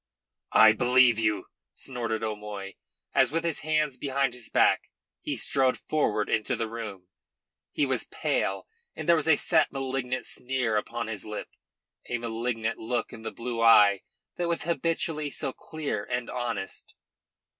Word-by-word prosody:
"I 110 - +8
believe 125 0 +4
you," 105 -2 +1 0.3
snorted 115 -4 -4
O'Moy, 105 -2 -5 0.4
as 135 -2 +4
with 165 +1 0
his 165 -2 0
hands 155 -3 0
behind 135 -2 0
his 125 -2 -8
back - - +3 0.3
he - - -3
strode 130 -2 +2
forward 110 -9 0
into 110 -2 0
the 115 - -2
room. 105 -5 -7 0.6
He 145 - +1
was 130 -2 -1
pale, - - -1 0.3
and - - -6
there 170 - +7
was 160 -1 -1
a 160 - +7
set, 160 +2 +3
malignant 135 -2 -3
sneer 125 -3 -1
upon 115 +2 -2
his 105 -3 -4
lip, 105 0 -6 0.6
a 120 - 0
malignant 115 -1 -2
look 120 +1 -2
in 115 - -9
the 110 - -4
blue 115 -1 -4
eyes 105 -3 +7 0.4
that 175 - -1
were 170 - +2
habitually 165 -2 -1
so 135 -1 -3
clear 150 -10 -4
and 125 -1 -3
honest. 120 -6 -4
125 Hz, 155 wpm, -27 LUFS, 110-140 Hz, 0.6 s, I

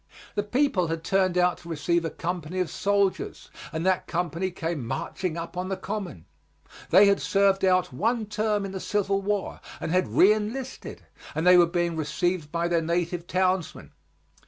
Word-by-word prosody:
The 205 - 0
people 210 - +1
had 165 0 -3
turned 185 0 +1
out 180 0 +2
to 170 - -12
receive 170 +2 0
a 165 - -1
company 175 +1 -4
of 180 - -1
soldiers, 200 -2 -1 0.2
and 160 +1 -3
that 185 -1 +1
company 175 +1 -2
came 165 -5 -4
marching 170 +6 -3
up 165 +1 -6
on 180 +1 -3
the 195 - -2
Common. 180 - -5 0.6
They 190 +4 +7
had 200 0 +3
served 195 -1 +2
out 185 -6 +2
one 225 - 0
term 210 -1 -1
in 195 - -5
the 190 - -5
Civil 195 0 0
War 205 0 -2 0.2
and - - -3
had 185 +1 +3
reënlisted, 215 +6 +1 0.3
and 160 +3 -1
they 180 0 +8
were 175 -1 +6
being 170 -1 -1
received 160 +1 -1
by 170 0 0
their 170 -1 +1
native 170 +1 -2
townsmen. 185 -2 -1
180 Hz, 175 wpm, -26 LUFS, 170-195 Hz, 0.6 s, they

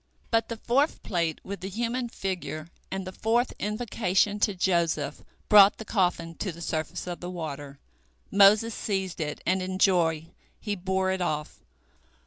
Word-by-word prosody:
But 225 -1 +2
the 230 - -4
fourth 270 +7 +1
plate 170 -5 -1
with 200 +1 -6
the 190 +2 -5
human 235 +4 -2
figure 175 -6 -4 0.2
and 190 0 -4
the 185 - -5
fourth 230 +5 +1
invocation 210 -2 0
to 205 -1 +1
Joseph 170 -5 0 0.3
brought 205 -2 +8
the 220 - -8
coffin 175 -5 0
to 195 - -2
the 165 - -12
surface 160 0 -3
of 175 -1 -5
the 175 - -6
water. 145 -5 -6 0.5
Moses 205 +3 +6
seized 190 -5 -2
it, 150 -1 -4
and 185 +1 +2
in 185 0 -3
joy 165 -4 +2 0.3
he 210 -2 -3
bore 190 0 0
it 190 0 -2
off. 150 -3 -2
190 Hz, 160 wpm, -27 LUFS, 170-210 Hz, 0.5 s, brought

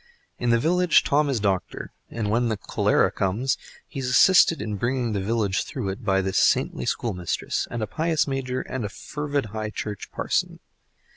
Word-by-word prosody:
In 120 - 0
the 115 - +5
village 175 +5 +3
Tom 145 +1 +2
is 130 -4 0
doctor, 100 -3 -2 0.2
and, 110 -3 -3
when 120 +2 +2
the 110 - -1
cholera - - +1
comes, 105 +8 0 0.3
he - - -7
is 130 -1 -2
assisted 175 +3 +6
in 105 -1 -3
bringing 120 +1 -1
the 100 - -1
village 100 -1 0
through 120 -8 -4
it 100 +6 -6
by 95 -2 +2
this 95 0 0
saintly 60 - +2
schoolmistress, 90 -7 -2
and 120 -2 -3
a - - +1
pious 160 +7 0
Major, 130 -2 -2
and 130 -2 -5
a 105 - -3
fervid 145 +5 -3
High 110 -1 -3
Church 105 -1 -6
parson. - - -1
115 Hz, 185 wpm, -24 LUFS, 105-135 Hz, 0.3 s, assisted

